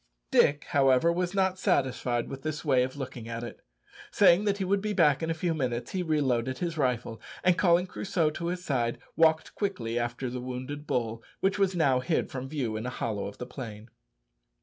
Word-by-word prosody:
Dick, 145 Hz, 0 st, +4 dB
however, 135 Hz, +4 st, +4 dB
was 180 Hz, +2 st, -2 dB
not 190 Hz, -1 st, +1 dB
satisfied 130 Hz, -, 0 dB
with 135 Hz, 0 st, -7 dB
this 155 Hz, 0 st, -4 dB
way 130 Hz, -4 st, +4 dB
of 130 Hz, +2 st, -2 dB
looking 130 Hz, -4 st, -6 dB
at 115 Hz, 0 st, -4 dB
it. 120 Hz, -, -8 dB, 0.5 s
Saying 185 Hz, +5 st, +5 dB
that 200 Hz, -1 st, +1 dB
he 195 Hz, -, -1 dB
would 195 Hz, +1 st, +1 dB
be 210 Hz, 0 st, -2 dB
back 150 Hz, -6 st, +4 dB
in 160 Hz, -, -2 dB
a 165 Hz, -, 0 dB
few 165 Hz, +1 st, 0 dB
minutes, 125 Hz, -5 st, -2 dB
he 185 Hz, -, -1 dB
reloaded 130 Hz, -6 st, 0 dB
his 170 Hz, -2 st, -2 dB
rifle, 125 Hz, -6 st, -1 dB, 0.2 s
and 180 Hz, -1 st, +5 dB
calling 175 Hz, -1 st, +4 dB
Crusoe 180 Hz, -3 st, -1 dB
to 170 Hz, +2 st, -4 dB
his 180 Hz, +1 st, -3 dB
side, 120 Hz, -4 st, 0 dB, 0.2 s
walked 160 Hz, -1 st, +3 dB
quickly 120 Hz, -, -2 dB
after 120 Hz, +2 st, -3 dB
the 125 Hz, 0 st, -4 dB
wounded 130 Hz, +4 st, -6 dB
bull, 115 Hz, -2 st, -1 dB, 0.2 s
which 195 Hz, +1 st, +1 dB
was 190 Hz, -2 st, +2 dB
now 140 Hz, -7 st, +3 dB
hid 125 Hz, -, -1 dB
from 130 Hz, 0 st, -5 dB
view 130 Hz, -7 st, -2 dB
in 110 Hz, +3 st, -3 dB
a -, -, -1 dB
hollow 110 Hz, -5 st, -3 dB
of 100 Hz, -, -9 dB
the 125 Hz, -, -5 dB
plain. 115 Hz, -4 st, -8 dB
140 Hz, 205 wpm, -28 LUFS, 125-170 Hz, 0.5 s, Saying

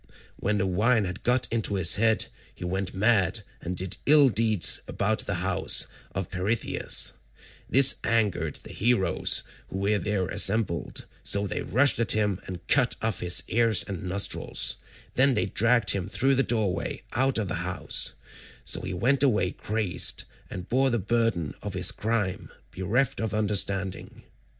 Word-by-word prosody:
When 105 Hz, +1 st, -1 dB
the 95 Hz, -, 0 dB
wine 105 Hz, +4 st, +1 dB
had 90 Hz, +1 st, -6 dB
got 125 Hz, +1 st, +1 dB
into 110 Hz, -3 st, 0 dB
his 90 Hz, 0 st, +3 dB
head, 110 Hz, +1 st, +2 dB, 0.3 s
he 90 Hz, -, -7 dB
went 95 Hz, +1 st, -3 dB
mad 105 Hz, -1 st, +2 dB, 0.2 s
and 90 Hz, +1 st, -5 dB
did 95 Hz, -1 st, -2 dB
ill 145 Hz, -2 st, +6 dB
deeds 110 Hz, -3 st, +2 dB
about -, -, -1 dB
the -, -, -1 dB
house -, -, +2 dB, 0.3 s
of -, -, -4 dB
Peirithous; 105 Hz, +6 st, -1 dB, 0.6 s
this 135 Hz, +1 st, +6 dB
angered 100 Hz, -10 st, 0 dB
the -, -, -11 dB
heroes 110 Hz, -3 st, +1 dB, 0.2 s
who -, -, -6 dB
were 100 Hz, +2 st, 0 dB
there 100 Hz, -3 st, -2 dB
assembled, 100 Hz, -2 st, +1 dB, 0.2 s
so 100 Hz, 0 st, +2 dB
they 100 Hz, -, -3 dB
rushed 130 Hz, +5 st, +2 dB
at 115 Hz, -4 st, +3 dB
him 105 Hz, -3 st, -1 dB
and 90 Hz, 0 st, -8 dB
cut 130 Hz, -3 st, +3 dB
off 110 Hz, -3 st, -1 dB
his 90 Hz, 0 st, +3 dB
ears 115 Hz, -2 st, +3 dB
and 95 Hz, -4 st, -6 dB
nostrils; 95 Hz, +2 st, 0 dB, 0.4 s
then 130 Hz, 0 st, +3 dB
they -, -, 0 dB
dragged 115 Hz, +4 st, +2 dB
him 95 Hz, -2 st, -2 dB
through 135 Hz, +6 st, +1 dB
the 135 Hz, -, +2 dB
doorway 110 Hz, -8 st, -2 dB
out 135 Hz, 0 st, +1 dB
of 110 Hz, -3 st, -1 dB
the 90 Hz, -, -3 dB
house, 90 Hz, 0 st, 0 dB, 0.5 s
so -, -, +1 dB
he 95 Hz, 0 st, -5 dB
went 130 Hz, +8 st, +1 dB
away 110 Hz, -10 st, +2 dB
crazed, 105 Hz, -4 st, -1 dB, 0.3 s
and 90 Hz, -, -7 dB
bore 135 Hz, +2 st, +2 dB
the 120 Hz, -, 0 dB
burden 110 Hz, -, -1 dB
of 100 Hz, -3 st, -5 dB
his 90 Hz, -1 st, +4 dB
crime, 105 Hz, -4 st, -2 dB, 0.2 s
bereft 115 Hz, +8 st, -1 dB
of 110 Hz, -2 st, -3 dB
understanding. 100 Hz, -2 st, -1 dB
105 Hz, 160 wpm, -26 LUFS, 95-115 Hz, 0.6 s, ill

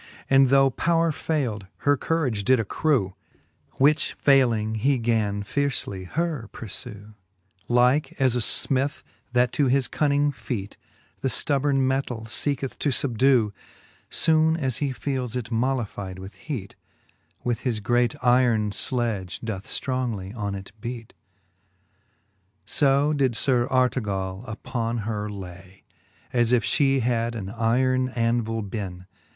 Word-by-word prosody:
And 135 Hz, -1 st, +6 dB
though 135 Hz, 0 st, +5 dB
powre 165 Hz, +4 st, +1 dB
faild, 125 Hz, -12 st, -2 dB, 0.2 s
her 145 Hz, 0 st, +5 dB
courage 135 Hz, -8 st, -1 dB
did 130 Hz, +3 st, +4 dB
accrew. 115 Hz, -, 0 dB, 0.6 s
Which 145 Hz, +3 st, +3 dB
fayling, 120 Hz, -6 st, +3 dB
he 130 Hz, +5 st, +2 dB
gan 110 Hz, -4 st, 0 dB
fiercely 115 Hz, -6 st, -2 dB
her 150 Hz, -, -2 dB
purfew. 105 Hz, -1 st, -7 dB, 0.5 s
Like 125 Hz, +6 st, +2 dB
as 130 Hz, -3 st, +3 dB
a -, -, +1 dB
finith, 135 Hz, +4 st, +2 dB, 0.3 s
that 125 Hz, 0 st, +3 dB
to 140 Hz, 0 st, +2 dB
his 130 Hz, 0 st, +2 dB
cunning 145 Hz, -1 st, +1 dB
featj 115 Hz, -6 st, -5 dB, 0.5 s
The -, -, -1 dB
ftubborn 140 Hz, +2 st, +2 dB
metall 130 Hz, -3 st, -1 dB
feeketh 135 Hz, +3 st, -2 dB
to 145 Hz, -, +1 dB
fubdew, 130 Hz, -4 st, +2 dB, 0.6 s
Soone 160 Hz, 0 st, +3 dB
as 130 Hz, -6 st, -1 dB
he 145 Hz, -, -1 dB
feeles 130 Hz, -2 st, -3 dB
it 120 Hz, -2 st, -4 dB
mollifide 115 Hz, -6 st, -2 dB
with 95 Hz, +2 st, -9 dB
heat, 100 Hz, 0 st, -6 dB, 0.7 s
With 120 Hz, -2 st, -1 dB
his 120 Hz, -4 st, -2 dB
great 120 Hz, +2 st, +1 dB
yron 120 Hz, -4 st, +3 dB
fledge 110 Hz, -8 st, -2 dB
doth 110 Hz, -3 st, -5 dB
ftrongly 120 Hz, -7 st, -3 dB
on 100 Hz, -3 st, -3 dB
it 95 Hz, 0 st, -8 dB
beat; 115 Hz, -1 st, -6 dB
VIII. 100 Hz, -2 st, -43 dB, 0.2 s
So 140 Hz, +1 st, +2 dB
did 135 Hz, -5 st, +1 dB
Sir 125 Hz, 0 st, +2 dB
Artegall 105 Hz, -6 st, 0 dB
upon 115 Hz, +2 st, -3 dB
her 105 Hz, -1 st, -3 dB
lay, 95 Hz, -1 st, -10 dB, 0.2 s
> -, -, -33 dB
As 120 Hz, -1 st, +3 dB
if 125 Hz, -2 st, +3 dB
flie 135 Hz, -2 st, +2 dB
had 120 Hz, 0 st, 0 dB
an 100 Hz, -2 st, -5 dB
yron 130 Hz, +3 st, +1 dB
andvile 115 Hz, -2 st, 0 dB
beenc. 95 Hz, -3 st, -6 dB
120 Hz, 135 wpm, -25 LUFS, 105-135 Hz, 0.7 s, And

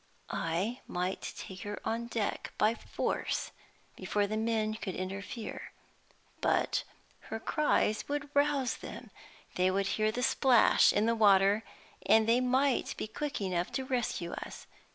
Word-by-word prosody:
I 185 Hz, +10 st, -1 dB
might 180 Hz, +2 st, -3 dB
take 190 Hz, -1 st, -8 dB
her 205 Hz, 0 st, -5 dB
on 230 Hz, +1 st, -2 dB
deck 225 Hz, -3 st, -3 dB
by 215 Hz, +2 st, +3 dB
force -, -, -2 dB, 0.4 s
before 205 Hz, -1 st, 0 dB
the 210 Hz, +2 st, -3 dB
men 220 Hz, -1 st, 0 dB
could 210 Hz, -4 st, -5 dB
interfere. 200 Hz, +4 st, -6 dB, 0.7 s
But -, -, +1 dB, 0.5 s
her 220 Hz, -, -3 dB
cries 255 Hz, -5 st, +1 dB
would 290 Hz, 0 st, -2 dB
rouse 285 Hz, -3 st, +2 dB
them; -, -, -9 dB, 0.5 s
they 185 Hz, +1 st, +3 dB
would 195 Hz, +1 st, +1 dB
hear 215 Hz, +2 st, +1 dB
the 250 Hz, +3 st, -3 dB
splash 260 Hz, -2 st, +5 dB
in 210 Hz, -, +2 dB
the 230 Hz, -, +3 dB
water, 200 Hz, -1 st, +5 dB, 0.4 s
and 220 Hz, 0 st, +5 dB
they 235 Hz, +2 st, +4 dB
might 260 Hz, +1 st, +1 dB
be -, -, -2 dB
quick 285 Hz, +4 st, -4 dB
enough 180 Hz, -2 st, -1 dB
to 265 Hz, -, -2 dB
rescue 240 Hz, -9 st, -2 dB
us. -, -, -7 dB
220 Hz, 145 wpm, -31 LUFS, 200-250 Hz, 0.7 s, splash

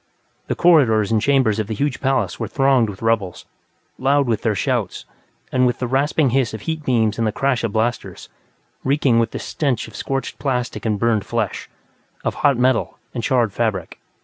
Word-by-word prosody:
The -, -, -1 dB
corridors 120 Hz, -, +4 dB
and 110 Hz, -1 st, +2 dB
chambers 130 Hz, -6 st, +2 dB
of 110 Hz, -, -2 dB
the 110 Hz, -, -3 dB
huge 140 Hz, +3 st, -2 dB
palace 135 Hz, -1 st, 0 dB
were -, -, -2 dB
thronged 135 Hz, -5 st, +2 dB
with 105 Hz, +2 st, -9 dB
rebels, 110 Hz, -6 st, -1 dB, 0.5 s
loud 140 Hz, +2 st, +2 dB
with 115 Hz, -3 st, -1 dB
their 110 Hz, -3 st, 0 dB
shouts, -, -, -2 dB, 0.5 s
and 125 Hz, -1 st, +3 dB
with 120 Hz, -, -1 dB
the 125 Hz, -, -2 dB
rasping 135 Hz, +2 st, +1 dB
hiss 125 Hz, -4 st, +1 dB
of 110 Hz, -, -8 dB
heat 160 Hz, +2 st, -4 dB
beams 115 Hz, -5 st, +1 dB
and 115 Hz, -, +1 dB
the -, -, 0 dB
crash 130 Hz, 0 st, 0 dB
of 115 Hz, -, -1 dB
blasters, 115 Hz, +3 st, -2 dB, 0.6 s
reeking 135 Hz, -3 st, +2 dB
with 115 Hz, -1 st, +1 dB
the -, -, -6 dB
stench 135 Hz, -7 st, -2 dB
of -, -, -13 dB
scorched 135 Hz, 0 st, -4 dB
plastic 125 Hz, -4 st, -2 dB
and 105 Hz, -2 st, 0 dB
burned 110 Hz, -1 st, +1 dB
flesh, -, -, -3 dB, 0.5 s
of -, -, -1 dB
hot 140 Hz, -3 st, +4 dB
metal 125 Hz, 0 st, +1 dB, 0.2 s
and 120 Hz, -, -4 dB
charred 120 Hz, -6 st, +1 dB
fabric. 110 Hz, -5 st, -2 dB
120 Hz, 190 wpm, -20 LUFS, 110-135 Hz, 0.6 s, corridors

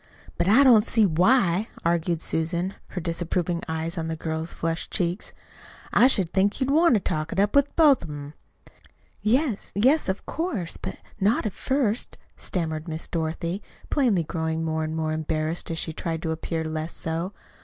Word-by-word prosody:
"But 175 Hz, -, 0 dB
I 230 Hz, +8 st, +7 dB
don't 235 Hz, -6 st, +7 dB
see 225 Hz, -1 st, +3 dB
why," 185 Hz, +2 st, +3 dB, 0.2 s
argued 170 Hz, -1 st, +1 dB
Susan, 170 Hz, +4 st, -1 dB
her 180 Hz, -, -5 dB
disapproving 170 Hz, +1 st, -1 dB
eyes 160 Hz, +1 st, -2 dB
on 160 Hz, -, -3 dB
the 160 Hz, -, -2 dB
girl's 160 Hz, +1 st, -3 dB
flushed 165 Hz, 0 st, -3 dB
cheeks. 175 Hz, +2 st, -1 dB, 0.6 s
"I 245 Hz, -, +7 dB
should 190 Hz, -10 st, +2 dB
think 200 Hz, +4 st, +2 dB
you'd 265 Hz, 0 st, +1 dB
want 320 Hz, -2 st, +5 dB
to -, -, +3 dB
talk 155 Hz, -4 st, -2 dB
it -, -, -2 dB
up 205 Hz, +1 st, +2 dB
with 280 Hz, 0 st, +3 dB
both 300 Hz, -5 st, +6 dB
of -, -, -8 dB
'em." 145 Hz, 0 st, -7 dB, 0.9 s
"Yes, 235 Hz, +2 st, +1 dB
yes, 260 Hz, +6 st, +3 dB
of 190 Hz, -, -2 dB
course; 275 Hz, -, -2 dB
but -, -, -5 dB, 0.2 s
not 205 Hz, +4 st, +4 dB
not -, -, -3 dB
at 210 Hz, -, -2 dB
first," 255 Hz, -4 st, -1 dB, 0.2 s
stammered 160 Hz, -2 st, -2 dB
Miss 160 Hz, 0 st, -4 dB
Dorothy, 170 Hz, +3 st, -2 dB, 0.3 s
plainly 230 Hz, -, +3 dB
growing 160 Hz, 0 st, -2 dB
more 160 Hz, 0 st, -1 dB
and 155 Hz, 0 st, -3 dB
more 155 Hz, -1 st, -1 dB
embarrassed 155 Hz, +1 st, -2 dB
as 165 Hz, -, -3 dB
she 160 Hz, -, -3 dB
tried 165 Hz, 0 st, -4 dB
to 160 Hz, -, -1 dB
appear 160 Hz, 0 st, -3 dB
less 155 Hz, +1 st, -4 dB
so. 165 Hz, +4 st, -3 dB
170 Hz, 180 wpm, -25 LUFS, 160-210 Hz, 0.9 s, I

